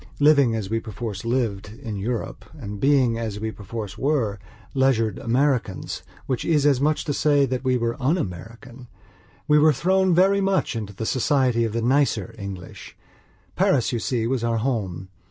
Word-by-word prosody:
Living, 140 -5 +5
as 110 -3 -3
we 115 +3 -1
perforce 105 -2 -6
lived, 110 -3 -2
in 110 -4 -4
Europe, 110 +4 -4
and 105 -6 -7
being, 130 -3 +3
as 110 -3 -4
we 110 +1 -3
perforce 105 -1 -7
were, 125 -9 0 0.3
leisured 130 -5 +1
Americans, 125 -5 0 0.2
which 130 -3 -2
is 150 -3 +2
as 140 -3 +3
much 150 +1 +2
as - - -6
to 145 - -2
say 145 -1 +3
that 130 0 -3
we 130 -1 +2
were 115 -1 -1
un 145 +8 +2
American, 115 - -7 0.6
we 150 -1 +5
were 155 +1 +6
thrown 185 +5 +2
very 195 +3 +4
much 195 -9 0
into 105 -3 -5
the 110 - -4
society 130 -1 +2
of 110 - -3
the 115 0 -1
nicer 130 -2 +1
English. 100 -3 -8 0.6
Paris, 130 -5 +2
you 120 - 0
see, 115 -1 -1
was 125 0 -1
our 115 -1 +1
home. 105 -7 -2
120 Hz, 175 wpm, -23 LUFS, 110-140 Hz, 0.6 s, were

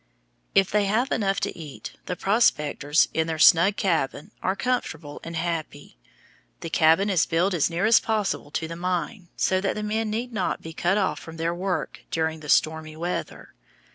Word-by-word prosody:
If 195 -1 +4
they 210 -1 +2
have 220 +6 0
enough 195 -3 +1
to - - -2
eat, 150 -5 -8 0.2
the 180 - -2
prospectors, 150 -8 +2
in 160 0 0
their 160 -1 -2
snug 170 +5 +6
cabin, 165 -2 -1
are 190 - 0
comfortable 215 - -3
and 165 0 -7
happy. 165 - -4 0.7
The 165 - -6
cabin 165 +5 +4
is 185 -6 +2
built 175 +4 +1
as 170 -3 +2
near 170 +4 -1
as 225 +1 +6
possible 210 -9 -2
to 160 +2 -3
the 165 - -6
mine, 180 +3 -3
so 185 0 +1
that 195 - -1
the 210 - -4
men 215 +1 -1
need 235 +3 -3
not 190 -4 -2
be 160 - -8
cut 175 +5 +1
off 195 -3 0
from 165 0 -10
their 165 +1 -1
work 180 +1 -3
during 160 -1 -1
the 150 -1 -10
stormy 155 0 +1
weather. 175 +2 -5
175 Hz, 185 wpm, -25 LUFS, 160-200 Hz, 0.7 s, snug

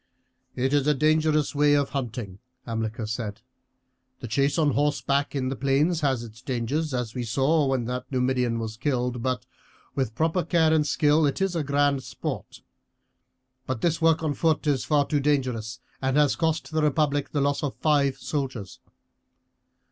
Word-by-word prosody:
"It 130 +2 0
is 145 -1 +2
a 150 - +4
dangerous 155 +1 +2
way 145 0 +4
of 140 -1 +1
hunting," 120 -8 -4 0.3
Hamilcar 115 -1 -3
said. 110 -1 -4 0.8
"The 125 - -6
chase 140 +7 +1
on 150 -3 +3
horseback 145 0 0
in 130 -2 -1
the 135 - -2
plains 145 +6 +1
has 135 -5 +1
its 115 0 -12
dangers, 135 +5 -2
as 125 -3 -3
we 125 - -3
saw 140 +6 +2
when 130 -3 0
that 125 +2 -5
Numidian 125 -2 +1
was 110 -1 -5
killed; 125 -2 -1
but 130 -2 -2 0.5
with 130 -5 -2
proper 165 +6 +1
care 160 -1 +3
and 150 -2 +2
skill 150 0 +3
it 140 - -2
is 195 -2 0
a 165 - 0
grand 140 -1 +1
sport. - - -6 1.1
But 130 -4 -3
this 165 -1 +1
work 165 0 +3
on 155 -2 0
foot 160 +3 +1
is 140 -4 0 0.2
too 145 - +1
dangerous, 130 -5 -1 0.2
and 130 +1 +1
has 150 -2 +4
cost 160 -1 -1
the 155 0 +1
republic 145 -1 +1
the 145 - 0
loss 140 0 +1
of 145 -3 -3
five 145 -3 +2
soldiers. 130 -9 -4
140 Hz, 170 wpm, -26 LUFS, 125-150 Hz, 1.1 s, a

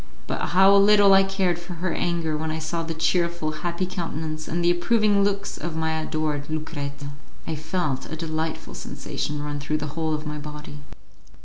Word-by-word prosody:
But - - -3
how 190 +2 +6
little 200 0 +7
I 195 - +8
cared 195 -3 +1
for 175 +1 -7
her 170 0 -1
anger 170 -3 0
when 160 +1 -2
I 155 - -2
saw 160 +1 -2
the 165 0 -4
cheerful, 170 -1 +1
happy 175 +1 -1
countenance, 160 -3 -4
and 170 +1 -1
the 175 - +6
approving 205 +3 +3
looks 200 0 -1
of 170 -2 -4
my 160 0 0
adored 155 -2 -2
Lucrezia! 145 -2 -4 0.3
I - - -3
felt 155 -3 -2
a - - -2
delightful 160 0 -3
sensation 150 0 -4
run 145 0 -3
through 150 +2 -1
the 150 -1 -5
whole 160 -1 0
of 150 +1 -5
my 150 0 -4
body. 150 0 -8
160 Hz, 185 wpm, -25 LUFS, 155-180 Hz, 0.3 s, I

